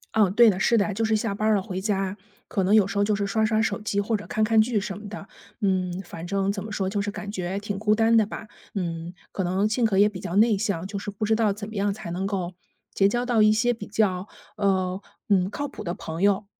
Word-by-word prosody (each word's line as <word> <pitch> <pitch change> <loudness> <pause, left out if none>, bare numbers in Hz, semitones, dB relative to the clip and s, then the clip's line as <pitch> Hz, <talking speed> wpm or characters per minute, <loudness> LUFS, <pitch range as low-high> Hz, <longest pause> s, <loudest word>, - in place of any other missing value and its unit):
嗯， 205 -4 +4
对 235 +2 +7
的， 190 -1 0
是 230 +3 +3
的， 205 -1 +1
就 225 +3 -1
是 220 0 +2
下 210 -1 -1
班 210 +2 -1
儿 215 - +4
了 195 - +1
回 190 -1 -5
家， 195 -1 -1 0.3
可 195 - -1
能 195 +3 +2
有 210 -3 +6
时 200 - -4
候 - - +4
就 210 0 +1
是 200 - -1
刷 220 +2 0
刷 220 0 +2
手 220 - -1
机 200 -1 -1
或 215 +2 0
者 205 - -4
看 220 -3 0
看 220 0 +5
剧 220 -1 +1
什 195 -1 -4
么 210 0 -9
的。 200 -2 -8 0.3
嗯， 185 -2 0
反 165 -1 -8
正 195 +1 0
怎 200 -1 -4
么 215 - -7
说， 195 -3 -1
就 205 +1 -1
是 205 - -2
感 205 0 -6
觉 185 -1 -3
挺 205 -1 -4
孤 215 0 +3
单 225 +1 +3
的 220 - +6
吧， 210 - -8 0.3
嗯， 170 -2 -3 0.2
可 190 - -2
能 190 +4 +1
性 230 +3 0
格 205 -3 +1
也 205 +1 +6
比 200 -3 -5
较 175 - -5
内 220 +1 +5
向， 195 -4 -2
就 200 +1 -4
是 205 - -5
不 205 +2 -3
知 220 +1 +3
道 220 -2 +2
怎 205 +1 -6
么 220 - -9
样 200 0 +1
才 195 -4 -6
能 190 +3 -2
够 185 -3 -3 0.4
结 195 - +4
交 240 +4 0
到 240 -3 +3
一 215 0 +6
些 240 +3 +2
比 205 -3 -8
较， 200 -2 0 0.3
呃， 190 -2 0 0.3
嗯， 190 -2 +3
靠 285 +8 -3
谱 - - -9
的 175 - -3
朋 160 -1 -6
友。 200 0 +3
205 Hz, 295 characters per minute, -25 LUFS, 190-215 Hz, 0.4 s, 对